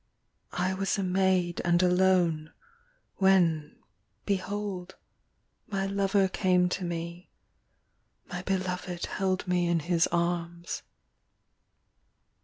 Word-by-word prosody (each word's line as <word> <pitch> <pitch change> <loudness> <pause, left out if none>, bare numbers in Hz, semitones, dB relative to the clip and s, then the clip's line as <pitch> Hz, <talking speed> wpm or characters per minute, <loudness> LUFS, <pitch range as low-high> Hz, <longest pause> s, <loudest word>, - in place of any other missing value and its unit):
I 185 +1 +1
was 195 +2 -1
a 195 - -1
maid 185 -2 +1
and 175 +1 +3
alone, 180 -4 +3 0.7
When, 175 -6 +3 0.5
behold, 195 -2 -3 0.7
my 195 -2 -1
lover 195 0 +2
came 180 -1 +2
to 185 - -3
me, 170 +1 -5 1.0
My 180 -1 -5
beloved 185 -2 -2
held 190 -1 -1
me 180 -1 +2
in 170 -1 +1
his 170 +1 +2
arms. 170 0 -2
180 Hz, 95 wpm, -29 LUFS, 175-190 Hz, 1.0 s, and